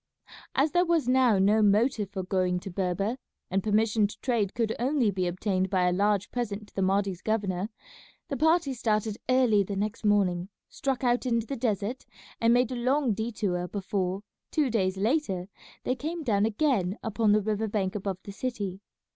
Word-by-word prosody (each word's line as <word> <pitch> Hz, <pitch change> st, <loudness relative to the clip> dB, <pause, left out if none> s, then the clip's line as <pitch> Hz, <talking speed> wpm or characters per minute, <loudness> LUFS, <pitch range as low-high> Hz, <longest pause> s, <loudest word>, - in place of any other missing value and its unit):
As 285 Hz, +3 st, +3 dB
there 355 Hz, 0 st, +4 dB
was 335 Hz, -6 st, +1 dB
now 255 Hz, -4 st, +4 dB
no 205 Hz, +3 st, +4 dB
motive 210 Hz, +1 st, +2 dB
for 195 Hz, -2 st, -4 dB
going 180 Hz, -1 st, 0 dB
to 195 Hz, -, -7 dB
Berber, 195 Hz, +6 st, -1 dB, 0.3 s
and 195 Hz, +1 st, +1 dB
permission 215 Hz, +1 st, +2 dB
to 210 Hz, -, -12 dB
trade 225 Hz, -7 st, 0 dB
could 225 Hz, -1 st, 0 dB
only 250 Hz, -3 st, +2 dB
be 185 Hz, -2 st, -1 dB
obtained 185 Hz, +1 st, -1 dB
by 185 Hz, -1 st, +2 dB
a -, -, +3 dB
large 200 Hz, +1 st, +1 dB
present 215 Hz, -4 st, -3 dB
to -, -, -30 dB
the 195 Hz, -, -1 dB
Mahdi's 195 Hz, -1 st, +1 dB
governor, 205 Hz, -3 st, -1 dB, 0.6 s
the 280 Hz, -, -3 dB
party 320 Hz, 0 st, +2 dB
started 215 Hz, -2 st, -1 dB
early 250 Hz, -5 st, +4 dB
the 200 Hz, +1 st, -3 dB
next 210 Hz, +3 st, -3 dB
morning, 195 Hz, -3 st, +2 dB, 0.2 s
struck 270 Hz, -2 st, -2 dB
out 245 Hz, +1 st, +1 dB
into 230 Hz, -2 st, +1 dB
the 275 Hz, -, -4 dB
desert, 225 Hz, 0 st, -2 dB, 0.3 s
and 230 Hz, 0 st, +4 dB
made 245 Hz, +1 st, +3 dB
a -, -, -2 dB
long 255 Hz, 0 st, +1 dB
detour 200 Hz, -5 st, -2 dB
before, 195 Hz, -1 st, -2 dB, 0.3 s
two 290 Hz, -5 st, +1 dB
days 190 Hz, -4 st, 0 dB
later, 200 Hz, -, 0 dB, 0.4 s
they 255 Hz, -, +1 dB
came 320 Hz, +5 st, -4 dB
down 210 Hz, -5 st, +2 dB
again 220 Hz, -, 0 dB
upon 220 Hz, -1 st, +1 dB
the 210 Hz, +1 st, +4 dB
river 215 Hz, +1 st, -1 dB
bank 200 Hz, -2 st, -1 dB
above 195 Hz, -3 st, -3 dB
the 200 Hz, -, -8 dB
city. 200 Hz, -4 st, -4 dB
210 Hz, 180 wpm, -28 LUFS, 195-245 Hz, 0.6 s, there